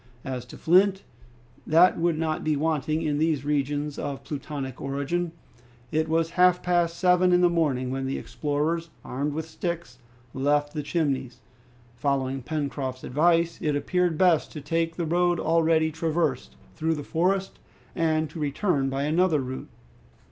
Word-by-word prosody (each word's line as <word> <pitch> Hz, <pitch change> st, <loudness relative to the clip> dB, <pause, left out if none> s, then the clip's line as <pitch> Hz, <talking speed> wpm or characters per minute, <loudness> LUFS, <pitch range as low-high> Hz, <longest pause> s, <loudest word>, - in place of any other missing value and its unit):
As 125 Hz, -2 st, -4 dB
to 125 Hz, -, -12 dB
flint, 190 Hz, +3 st, +3 dB, 0.6 s
that 170 Hz, +4 st, +6 dB
would 170 Hz, -1 st, +1 dB
not 160 Hz, -1 st, -1 dB
be 155 Hz, -1 st, +1 dB
wanting 155 Hz, +1 st, 0 dB
in 150 Hz, -2 st, 0 dB
these 155 Hz, -3 st, +1 dB
regions 145 Hz, 0 st, -1 dB
of 140 Hz, -1 st, -4 dB
Plutonic 140 Hz, -3 st, -6 dB
origin. 140 Hz, +5 st, -2 dB, 0.6 s
It 155 Hz, 0 st, 0 dB
was 165 Hz, 0 st, +1 dB
half 180 Hz, 0 st, +4 dB
past 175 Hz, -1 st, +1 dB
seven 180 Hz, 0 st, +4 dB
in 180 Hz, 0 st, +4 dB
the 175 Hz, -1 st, +4 dB
morning 135 Hz, -7 st, 0 dB
when 135 Hz, 0 st, -2 dB
the 135 Hz, -, -2 dB
explorers, 155 Hz, +3 st, -2 dB, 0.2 s
armed 140 Hz, +3 st, -2 dB
with 160 Hz, +1 st, -4 dB
sticks, 170 Hz, -6 st, -5 dB, 0.3 s
left 145 Hz, +2 st, +1 dB
the 150 Hz, -, -2 dB
Chimneys. 140 Hz, -5 st, -2 dB, 0.6 s
Following 135 Hz, +1 st, -1 dB
Pencroft's 140 Hz, -2 st, -3 dB
advice, 165 Hz, +4 st, +2 dB
it 150 Hz, -2 st, 0 dB
appeared 175 Hz, +3 st, 0 dB
best 175 Hz, -3 st, +3 dB
to 150 Hz, -, -6 dB
take 165 Hz, +2 st, -1 dB
the 170 Hz, -, -2 dB
road 175 Hz, +1 st, +2 dB
already 160 Hz, -1 st, +2 dB
traversed 160 Hz, -, -1 dB, 0.2 s
through 160 Hz, +1 st, 0 dB
the 145 Hz, -, -5 dB
forest, 190 Hz, +5 st, 0 dB, 0.4 s
and 160 Hz, -2 st, +1 dB
to 160 Hz, -, -8 dB
return 145 Hz, -1 st, 0 dB
by 135 Hz, +1 st, -2 dB
another 160 Hz, +1 st, +2 dB
route. 130 Hz, 0 st, -5 dB
155 Hz, 155 wpm, -26 LUFS, 140-170 Hz, 0.6 s, that